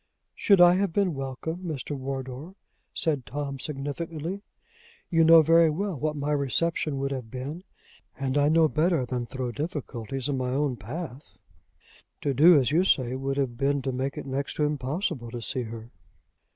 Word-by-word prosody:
"Should 200 -3 +4
I 175 0 +8
have 195 -2 +1
been 190 -1 +1
welcome, 135 +4 -4
Mr. 155 -6 -5
Wardour?" 135 +5 -6 0.4
said 150 -5 0
Tom, 140 +3 -5
significantly. 155 +6 -4 0.7
"You 165 -1 +4
know 165 0 +8
very 165 +1 +5
well 195 +6 -2
what 150 +2 -2
my 145 0 -2
reception 150 +1 0
would 135 0 -2
have 130 -4 -5
been; 140 +8 -6 0.5
and 135 0 -2
I 145 0 +4
know 160 0 +5
better 155 -2 +1
than 125 -1 -3
throw 130 -1 -4
difficulties 135 - -4
in 140 -2 -1
my 125 0 -1
own 140 -2 0
path. 135 - -8 0.8
To 140 - 0
do 160 +5 +7
as 130 0 +1
you 170 +4 +4
say 130 -9 +2
would 135 +1 -2
have 130 -4 -1
been 140 0 +1
to 135 - -1
make 130 +2 -3
it - - -5
next 135 +1 -3
to 150 - 0
impossible 150 - -2
to 120 +1 -6
see 125 +2 -2
her." 115 +1 -9
140 Hz, 175 wpm, -27 LUFS, 130-160 Hz, 0.8 s, I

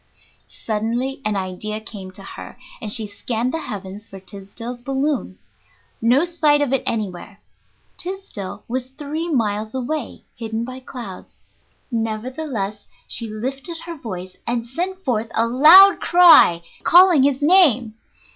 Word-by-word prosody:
Suddenly 235 +5 -2
an 215 -1 -1
idea 195 +3 -4
came 205 -3 -9
to 195 - -12
her, - - -10 0.2
and 215 -3 -4
she 220 0 0
scanned 230 +4 -3
the 325 - -1
heavens 205 -5 -7
for 195 - -11
Tysdell's 205 +5 -9
balloon. 270 - -2 0.6
No 250 +8 +3
sight 310 -4 +2
of 285 -3 0
it 270 - +2
anywhere. 200 -2 -4 0.6
Tysdell 365 - -6
was 255 +1 -3
three 300 +5 -5
miles 215 -5 -1
away, 260 +1 -4
hidden 225 0 -4
by 255 +1 -8
clouds. 240 -7 -10 0.5
Nevertheless 225 -1 -4 0.2
she 230 - -3
lifted 270 +10 -4
her 340 -1 -7
voice 185 - -8
and 235 -1 -1
sent 370 +9 -4
forth 225 -2 -1
a 225 - +3
loud 315 +12 +8
cry, 340 - +6 0.2
calling 355 -4 +6
his 275 +1 +1
name. 290 - +4
240 Hz, 135 wpm, -21 LUFS, 215-290 Hz, 0.6 s, loud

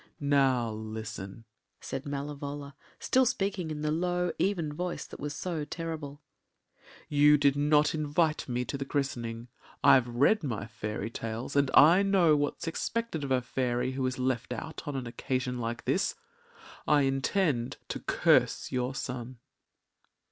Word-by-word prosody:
“Now 135 -5 +2
listen,” 110 -1 -7 0.4
said 135 +2 -5
Malevola, 140 0 -5 0.2
still 260 -1 +3
speaking 195 -6 -1
in 150 -1 -4
the 150 - +1
low, 180 +2 0
even 170 -6 0
voice 180 +3 -4
that - - -11
was 145 0 -4
so 165 -3 -3
terrible. 155 -2 -6 0.8
“You 150 0 +5
did 140 -1 +3
not 150 +1 +3
invite 155 0 0
me 125 0 -1
to 140 +3 -4
the - - -1
christening. 120 -4 -3 0.3
I’ve 130 -2 +6
read 135 - +3
my 115 -7 -3
fairy 105 0 -5
tales, 115 +4 -5
and 140 -2 +3
I 165 +6 +8
know 190 -6 +4
what’s 145 +2 -1
expected 170 0 -2
of 140 - -3
a 130 -1 +2
fairy 125 0 -1
who 135 0 -3
is 130 - -3
left 130 -1 -1
out 155 +7 -7
on 145 - -3
an 130 -2 -3
occasion 125 +1 -2
like 115 0 -4
this. - - +1 0.7
I 150 -1 +5
intend 135 -1 0
to - - -3
curse - - +2
your 125 +1 -1
son. 125 -1 -5
140 Hz, 150 wpm, -29 LUFS, 125-155 Hz, 0.8 s, I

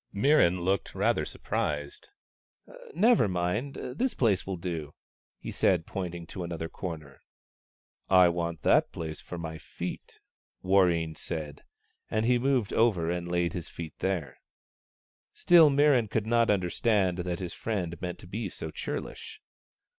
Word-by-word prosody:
Mirran 100 - +4
looked 95 0 0
rather - - +1
surprised. 75 -1 -3 0.4
" - - -16
Never 230 - +5
mind; 95 +9 -1
this 235 - -2
place 105 -7 +1
will 95 -2 -3
do," 85 -4 -5 0.4
he - - -7
said, 90 -3 +2
point 90 -3 -4
ing 85 -1 -7
to 90 +2 -6
another 85 -1 -4
corner. 80 -5 -7 0.5
" - - -53
I - - +7
want 85 -3 -3
that - - +4
place 80 -2 -6
for 90 - -8
my 80 -1 -6
feet," - - -7 0.4
Warreen 90 -4 +3
said. 75 -4 -6 0.5
And 110 +1 0
he 125 0 +3
moved 130 -4 +1
over 95 -8 +2
and 90 0 -3
laid 85 -1 0
his 85 -3 -5
feet 80 -2 -7
there. 95 -6 -2 0.9
Still 170 -3 +6
Mirran 140 -5 +4
could 110 0 -1
not 115 0 +3
understand 95 -1 +1
that 90 -1 -2
his 90 -2 -5
friend 90 -7 -3
meant 90 -1 -4
to 90 - -12
be 110 +6 -4
so - - -7
churlish. 435 - -6
90 Hz, 150 wpm, -28 LUFS, 85-115 Hz, 0.9 s, I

